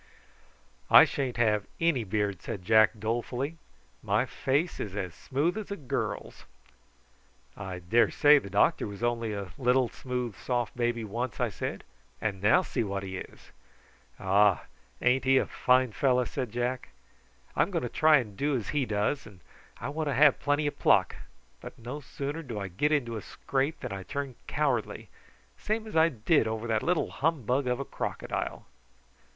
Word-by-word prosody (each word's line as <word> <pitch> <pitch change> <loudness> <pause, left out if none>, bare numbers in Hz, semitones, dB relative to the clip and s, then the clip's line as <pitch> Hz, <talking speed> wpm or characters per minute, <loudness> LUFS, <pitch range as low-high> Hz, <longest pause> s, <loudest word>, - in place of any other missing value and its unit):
"I - - +10
sha'n't 130 -4 -3
never 120 -1 +4
have 105 -1 -2
any 165 -8 +2
beard," 100 -2 -1
said 90 -4 -6
Jack, 110 +1 +5
dolefully; 120 +7 -2 0.4
"my - - +1
face 145 +6 -1
is 100 -3 -5
as 95 -4 -3
smooth 155 - -1
as 210 - -7
a 200 - -3
girl's!" 140 -9 -4 1.1
"I 95 -3 -6
daresay 120 - +4
the 100 - -9
doctor 100 +2 +2
was 100 +2 -8
only 115 -2 0
a 100 -3 -5
little 125 -1 +3
smooth 125 -4 -4
soft 120 -3 -2
baby 120 -1 -1
once," 115 +4 -4
I 125 -2 +1
said; 100 - -5 0.4
"and 100 -3 -3
now 110 - +5
see 120 - -2
what 100 -1 -3
he 95 -1 -5
is." - - -11 0.7
"Ah! 100 0 +3 0.4
ain't 125 +1 +3
he 135 0 +4
a - - +3
fine 130 -1 +2
fellow?" 125 +1 +2
said 125 -2 -4
Jack. 120 +2 -2 0.7
"I'm - - +2
going - - -2
to - - -1
try 155 +5 +5
and 110 -7 -4
do 145 +6 0
as 110 - -5
he 145 -4 0
does, 105 +7 -1
and 100 -4 -15 0.4
I 120 - -4
want 155 +1 -2
to 140 - -1
have 145 +1 +5
plenty 145 +1 +1
of 145 - -3
pluck; - - +4 0.4
but - - -10
no 125 +5 -6
sooner 145 +2 -5
do 120 -9 -6
I 100 -1 -4
get 145 - 0
into 120 -7 0
a - - -5
scrape 135 +8 -2
than - - -5
I 95 - -5
turn 140 +6 -4
cowardly, 135 -7 -1 0.5
same 220 +1 -2
as 215 - -9
I 160 +1 +5
did 125 0 +2
over 110 +1 -3
that 110 -2 0
little 180 -2 0
humbug 135 -4 0
of 125 +1 0
a 140 - -3
crocodile." - - -4
125 Hz, 175 wpm, -29 LUFS, 105-140 Hz, 1.1 s, I